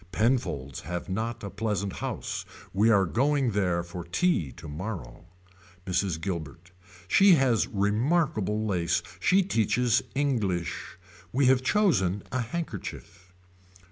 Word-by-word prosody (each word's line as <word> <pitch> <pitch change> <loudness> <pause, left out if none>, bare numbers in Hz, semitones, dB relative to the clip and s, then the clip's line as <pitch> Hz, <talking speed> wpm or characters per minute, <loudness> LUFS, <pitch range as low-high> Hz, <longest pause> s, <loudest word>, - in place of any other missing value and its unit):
Penfolds 100 - 0
have 90 +2 -5
not 110 +4 -3
a 100 - -5
pleasant 100 -2 -2
house - - -4 0.3
we 105 +4 +4
are 100 -4 +5
going 135 - +1
there 90 -4 +1
for 85 +1 -7
tea 85 - +1
tomorrow. 85 - -7 0.6
Mrs. 90 -2 0
Guilbert. 85 0 -5 0.4
She 195 - +6
has 130 -6 +2
remarkable 110 - +1
lace. 85 -4 0 0.2
She 190 - +4
teaches 120 - +2
English. 100 - -1 0.3
We 135 +2 +2
have 130 0 +5
chosen 115 - +2
a 130 - -1
handkerchief. 105 - -6
100 Hz, 115 wpm, -27 LUFS, 90-125 Hz, 0.6 s, She